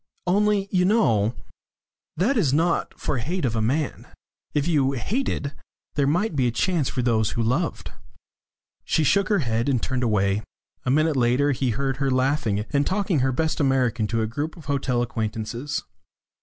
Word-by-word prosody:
"Only 200 Hz, +2 st, +2 dB
you 180 Hz, -2 st, +3 dB
know 120 Hz, -, +2 dB, 0.8 s
that 215 Hz, -, +2 dB
is 150 Hz, -, +2 dB
not 165 Hz, +2 st, 0 dB
for 135 Hz, -, -1 dB
hate 165 Hz, +7 st, -2 dB
of 115 Hz, -2 st, -1 dB
a 110 Hz, -, 0 dB
man. 140 Hz, +7 st, -1 dB, 0.4 s
If 145 Hz, +1 st, 0 dB
you 140 Hz, -5 st, +2 dB
hated, 145 Hz, -, -2 dB, 0.4 s
there 140 Hz, -2 st, +1 dB
might 175 Hz, +5 st, +1 dB
be 130 Hz, -3 st, +2 dB
a -, -, +1 dB
chance 165 Hz, +3 st, 0 dB
for 125 Hz, -, -2 dB
those 110 Hz, -3 st, +1 dB
who 115 Hz, -, +1 dB
loved." 145 Hz, +9 st, -1 dB, 0.9 s
She 160 Hz, -, +1 dB
shook 190 Hz, +7 st, +2 dB
her 200 Hz, -9 st, +2 dB
head 115 Hz, +3 st, 0 dB
and 130 Hz, -3 st, +2 dB
turned 130 Hz, +2 st, -2 dB
away. 105 Hz, -3 st, +1 dB, 0.4 s
A -, -, 0 dB
minute 155 Hz, +3 st, +3 dB
later 130 Hz, +3 st, +2 dB
he 130 Hz, -1 st, 0 dB
heard 135 Hz, +3 st, -1 dB
her 135 Hz, 0 st, 0 dB
laughing, 130 Hz, -5 st, +1 dB
and 140 Hz, 0 st, +2 dB
talking 190 Hz, -5 st, +1 dB
her 130 Hz, +1 st, +2 dB
best 160 Hz, +6 st, -1 dB
American 125 Hz, -5 st, +1 dB
to 115 Hz, 0 st, 0 dB
a -, -, +1 dB
group 145 Hz, +10 st, -4 dB
of 160 Hz, -, -12 dB
hotel 135 Hz, -4 st, 0 dB
acquaintances. 115 Hz, +3 st, -3 dB
135 Hz, 175 wpm, -24 LUFS, 120-160 Hz, 0.9 s, you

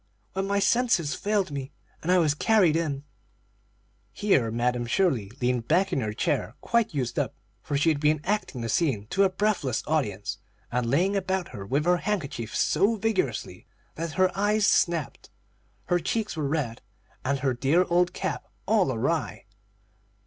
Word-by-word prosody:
when 195 Hz, +1 st, -2 dB
my 200 Hz, 0 st, +1 dB
senses 200 Hz, -8 st, +2 dB
failed 205 Hz, -5 st, 0 dB
me, 140 Hz, -1 st, -5 dB, 0.3 s
and 175 Hz, -, 0 dB
I 185 Hz, -, +5 dB
was 155 Hz, -4 st, +3 dB
carried 180 Hz, -1 st, +3 dB
in." 145 Hz, -4 st, -1 dB, 1.1 s
Here 130 Hz, -, +2 dB
Madam 120 Hz, +1 st, 0 dB
Shirley 120 Hz, -, +1 dB
leaned 125 Hz, -2 st, 0 dB
back 185 Hz, +4 st, +2 dB
in 135 Hz, -, +1 dB
her 110 Hz, -2 st, -2 dB
chair 105 Hz, -, -1 dB
quite 235 Hz, -2 st, +1 dB
used 125 Hz, -4 st, -1 dB
up, -, -, -2 dB, 0.3 s
for 145 Hz, -, -2 dB
she 150 Hz, +4 st, +3 dB
had 155 Hz, -3 st, +1 dB
been 150 Hz, +1 st, +2 dB
acting 200 Hz, -, -2 dB
the 115 Hz, -, -3 dB
scene 120 Hz, -6 st, 0 dB
to 195 Hz, -, +2 dB
a -, -, +3 dB
breathless 185 Hz, -, 0 dB
audience, 115 Hz, -11 st, -1 dB, 0.3 s
and 120 Hz, -1 st, 0 dB
laying 180 Hz, +10 st, +2 dB
about 190 Hz, -2 st, -1 dB
her 100 Hz, -1 st, -8 dB
with 140 Hz, +6 st, 0 dB
her 180 Hz, 0 st, +4 dB
handkerchief 155 Hz, -, -3 dB
so 200 Hz, +8 st, +2 dB
vigorously 190 Hz, -, -2 dB, 0.3 s
that 165 Hz, 0 st, -4 dB
her 185 Hz, -1 st, +2 dB
eyes 205 Hz, +1 st, +2 dB
snapped, 170 Hz, -8 st, +1 dB, 0.6 s
her 175 Hz, -, +2 dB
cheeks 210 Hz, +5 st, -2 dB
were 155 Hz, -3 st, -1 dB
red, 135 Hz, -6 st, -2 dB, 0.4 s
and 135 Hz, 0 st, -1 dB
her 135 Hz, -1 st, +1 dB
dear 140 Hz, +9 st, +2 dB
old 175 Hz, +1 st, +2 dB
cap -, -, -4 dB, 0.2 s
all -, -, +3 dB
awry. -, -, -2 dB
160 Hz, 165 wpm, -26 LUFS, 130-190 Hz, 1.1 s, I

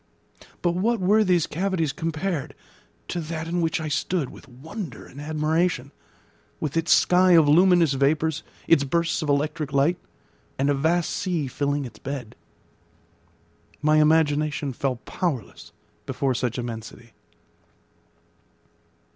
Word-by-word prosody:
But 175 Hz, -, +3 dB
what 220 Hz, +6 st, +1 dB
were 205 Hz, +4 st, +4 dB
these 180 Hz, -5 st, +2 dB
cavities 175 Hz, -3 st, -1 dB
compared 165 Hz, -1 st, -3 dB, 0.5 s
to 175 Hz, -, -3 dB
that 160 Hz, 0 st, -5 dB
in 175 Hz, +1 st, -1 dB
which 165 Hz, 0 st, 0 dB
I 160 Hz, -, -4 dB
stood 150 Hz, 0 st, -1 dB
with -, -, -14 dB
wonder 150 Hz, -, -8 dB
and 140 Hz, -, -11 dB
admiration, 155 Hz, -2 st, 0 dB, 0.7 s
with 150 Hz, -1 st, -3 dB
its 165 Hz, 0 st, +1 dB
sky 180 Hz, 0 st, +5 dB
of 160 Hz, -3 st, +6 dB
luminous 170 Hz, -1 st, +5 dB
vapours, 150 Hz, +3 st, +1 dB, 0.3 s
its 155 Hz, -4 st, +5 dB
bursts 170 Hz, +5 st, 0 dB
of 155 Hz, -, -3 dB
electric 150 Hz, +1 st, 0 dB
light, 145 Hz, +6 st, +2 dB, 0.6 s
and 140 Hz, +2 st, +2 dB
a -, -, +3 dB
vast 160 Hz, +5 st, +1 dB
sea 175 Hz, -6 st, -1 dB
filling 140 Hz, +2 st, -1 dB
its 120 Hz, -, -11 dB
bed? 135 Hz, -5 st, -6 dB, 1.5 s
My 155 Hz, +1 st, +4 dB
imagination 150 Hz, -2 st, +2 dB
fell 130 Hz, +1 st, -1 dB
powerless 145 Hz, -, -4 dB, 0.4 s
before 135 Hz, -2 st, 0 dB
such 125 Hz, 0 st, -2 dB
immensity. 115 Hz, -1 st, -7 dB
155 Hz, 130 wpm, -24 LUFS, 140-170 Hz, 1.5 s, of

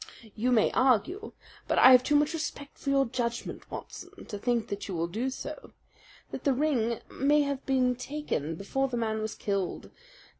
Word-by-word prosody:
"You 245 Hz, +4 st, 0 dB
may 225 Hz, -3 st, +4 dB
argue 270 Hz, -, +1 dB, 0.3 s
but -, -, 0 dB
I 260 Hz, -, +9 dB
have 250 Hz, -1 st, +8 dB
too 295 Hz, -, +2 dB
much 295 Hz, +2 st, +3 dB
respect 295 Hz, -3 st, -5 dB
for 280 Hz, -, -3 dB
your 275 Hz, 0 st, +4 dB
judgment, 235 Hz, -1 st, -4 dB
Watson, -, -, -9 dB
to 205 Hz, -, -6 dB
think 235 Hz, 0 st, 0 dB
that 200 Hz, 0 st, -4 dB
you 190 Hz, -, -4 dB
will 165 Hz, 0 st, 0 dB
do 225 Hz, +10 st, -2 dB
so 265 Hz, -, -7 dB, 0.6 s
that -, -, -6 dB
the 280 Hz, -, +3 dB
ring 250 Hz, -5 st, 0 dB
may 295 Hz, +2 st, +3 dB
have 280 Hz, -1 st, -3 dB
been 255 Hz, -2 st, +2 dB
taken 245 Hz, -, -3 dB
before 270 Hz, +10 st, -1 dB
the 250 Hz, -2 st, -3 dB
man 220 Hz, -2 st, -1 dB
was 215 Hz, 0 st, -4 dB
killed. 200 Hz, -3 st, -3 dB
250 Hz, 185 wpm, -29 LUFS, 220-280 Hz, 0.6 s, I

